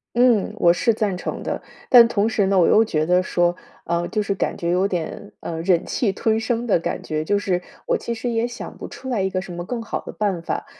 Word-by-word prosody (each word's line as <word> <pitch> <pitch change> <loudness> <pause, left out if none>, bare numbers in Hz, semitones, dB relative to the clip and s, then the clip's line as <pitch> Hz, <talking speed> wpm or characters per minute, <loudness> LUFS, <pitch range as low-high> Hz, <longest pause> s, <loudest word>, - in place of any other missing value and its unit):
嗯， 235 -4 +3
我 170 -4 +5
是 230 +5 +2
赞 210 -4 -1
成 180 - -5
的。 - - -3 0.3
但 240 -2 +9
同 215 -2 +1
时 215 -3 +1
呢， 195 -1 +3
我 170 - +5
又 220 - +6
觉 155 -8 0
得 180 +2 +3
说， 175 -1 +1 0.3
啊， 170 0 0
就 215 - -1
是 200 -1 -1
感 - - -2
觉 170 - -2
有 180 +2 +2
点， 185 +2 -4
呃， 165 -1 -5
忍 175 -1 +2
气 215 -6 0
吞 220 +3 0
声 230 +1 -1
的 205 - +4
感 - - -3
觉。 155 0 -3
就 205 +5 +1
是， 180 -3 -1 0.3
我 - - +2
其 235 - -4
实 235 +2 -3
也 230 0 0
想 240 -1 -7
不 - - -8
出 260 - -10
来 240 -6 0
一 190 - +1
个 185 0 -2
什 180 -2 -8
么 175 0 -5
更 230 +5 -4
好 225 - -4
的 - - -8
办 195 -5 -1
法， - - -3
200 Hz, 270 characters per minute, -22 LUFS, 175-225 Hz, 0.3 s, 但